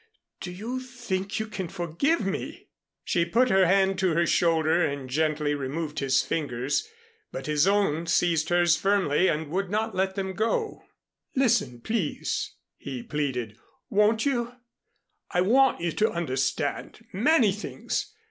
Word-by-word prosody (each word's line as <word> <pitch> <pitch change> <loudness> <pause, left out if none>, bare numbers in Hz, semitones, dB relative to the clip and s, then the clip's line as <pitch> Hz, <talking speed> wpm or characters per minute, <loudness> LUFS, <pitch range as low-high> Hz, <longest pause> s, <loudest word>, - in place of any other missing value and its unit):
Do 180 - -6
you 225 +8 -4
think 220 -6 -4
you 220 - -1
can 195 -4 -5
forgive 180 - -1
me?" 195 - -5 0.3
She 170 - +1
put 235 +9 +2
her 190 -1 +5
hand 190 0 +3
to 185 -4 +2
her 170 0 +3
shoulder 165 0 +2
and 140 -2 -2
gently 150 +2 0
removed 150 +3 -3
his 135 -1 +2
fingers. 145 - -2 0.4
But - - -6
his 150 +2 +2
own 195 -5 +1
seized 170 -2 +2
hers 175 -2 +4
firmly 190 -4 +2
and 150 -2 -1
would 190 +1 -1
not 220 +2 -1
let 190 0 0
them 190 -1 -3
go. 230 - -1 0.5
"Listen, 175 - +1
please," 215 - -2 0.2
he 130 -4 -6
pleaded, 125 -7 -3 0.3
"won't 215 +3 +3
you? 245 -3 -1 0.7
I 180 - +1
want 255 +3 +4
you 170 -1 0
to 215 +7 +1
understand 135 -6 -2
many 235 - +4
things. 315 - -4
180 Hz, 145 wpm, -26 LUFS, 155-215 Hz, 0.7 s, her